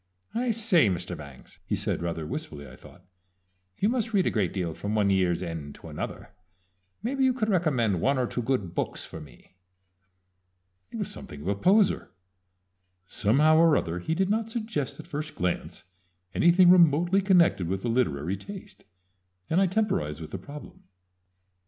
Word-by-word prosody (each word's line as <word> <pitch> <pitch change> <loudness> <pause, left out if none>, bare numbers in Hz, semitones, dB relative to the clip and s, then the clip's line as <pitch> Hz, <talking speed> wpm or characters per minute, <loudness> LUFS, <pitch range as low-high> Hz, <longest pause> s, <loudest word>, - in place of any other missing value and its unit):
"I 245 +2 -1
say, 210 - +4
Mr. 90 -1 -3
Bangs," 70 -4 -13
he - - -2
said, - - -2
rather 85 -2 -3
wistfully, 75 -1 -6
I 65 - -12
thought, - - -17 0.7
"you 205 - +1
must 230 -2 -1
read 190 - +3
a - - +1
great 100 -6 0
deal 90 -4 -3
from 105 +6 -4
one 100 -2 +2
year's 90 -2 +1
end 80 -4 -6
to - - -12
another - - -6 0.7
maybe 265 +3 0
you 260 -1 +4
could 225 -4 -1
recommend 130 - +1
one 140 +1 +2
or 125 - +1
two 120 - -3
good 110 -8 -1
books - - -3
for 80 - -9
me?" 70 +2 -16 1.4
It - - -11
was - - -3
something 75 - -9
of 80 - -7
a - - +2
poser. 190 - +2 1.0
Somehow 140 - +3
or 165 -2 +5
other 85 0 -2
he 160 - -2
did 190 +2 +1
not 225 +1 0
suggest 215 - -3
at - - -9
first 150 +1 -5
glance 90 0 -3 0.5
anything 175 +1 +6
remotely 175 +2 +4
connected 175 - +3
with 95 +5 -3
a - - 0
literary 100 - 0
taste, 195 - -11 0.7
and 175 +4 +3
I 195 - +4
temporized 170 - -1
with 80 - -8
the 95 - -5
problem. 145 +9 -11
130 Hz, 170 wpm, -27 LUFS, -, 1.4 s, anything